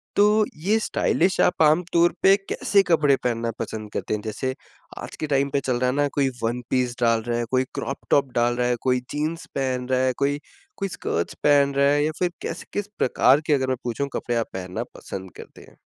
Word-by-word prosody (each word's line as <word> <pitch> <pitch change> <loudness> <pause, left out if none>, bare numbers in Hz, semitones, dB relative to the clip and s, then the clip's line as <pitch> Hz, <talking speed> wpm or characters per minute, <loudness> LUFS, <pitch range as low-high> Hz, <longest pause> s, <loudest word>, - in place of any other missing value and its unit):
तो 210 +1 +4 0.2
ये 215 +2 +3
स्टाइलिश 190 -3 +1
आप 180 - +2
आमतौर 170 +2 +3
पे 195 +1 +7
कैसे 200 -1 +2
कपड़े 150 -5 +4
पहनना 115 -1 -1
पसंद 110 -2 -5
करते - - -3
हैं? 105 - -2
जैसे 125 +5 -3 0.5
आज - - -8
के 155 - -2
टाइम 140 -1 +1
पे 140 - +3
चल 125 -2 0
रहा 125 0 +2
है - - -4
न - - +1
कोई 140 -2 +2
वन 120 +2 -1
पीस 125 -2 0
डाल 115 -1 +3
रहा 120 0 0
है, 120 - -1
कोई 130 0 +3
क्रॉप 135 - -3
टॉप 140 -3 +3
डाल 120 0 +2
रहा 125 0 0
है, 125 - +1
कोई 125 -1 +2
जीन्स 155 +3 -3
पहन 130 -2 -1
रहा 130 0 +2
है, 130 - +1
कोई 140 +1 0 0.4
कोई 195 - -2
स्कर्ट्स 85 - -3
पहन 140 -1 +4
रहा 140 0 +4
है 145 0 +2
या 155 - 0
फिर 180 -1 +1
कैसे - - -5
किस 205 0 -2
प्रकार 130 +2 +4
के 155 - +4
अगर 130 -2 +1
मैं 130 - 0
पूछूँ 120 +3 -2
कपड़े 120 -2 -1
पहनना 90 -1 -4
पसंद 95 -2 -8
करते - - -12
हैं? - - -18
135 Hz, 220 wpm, -24 LUFS, 120-150 Hz, 0.5 s, पे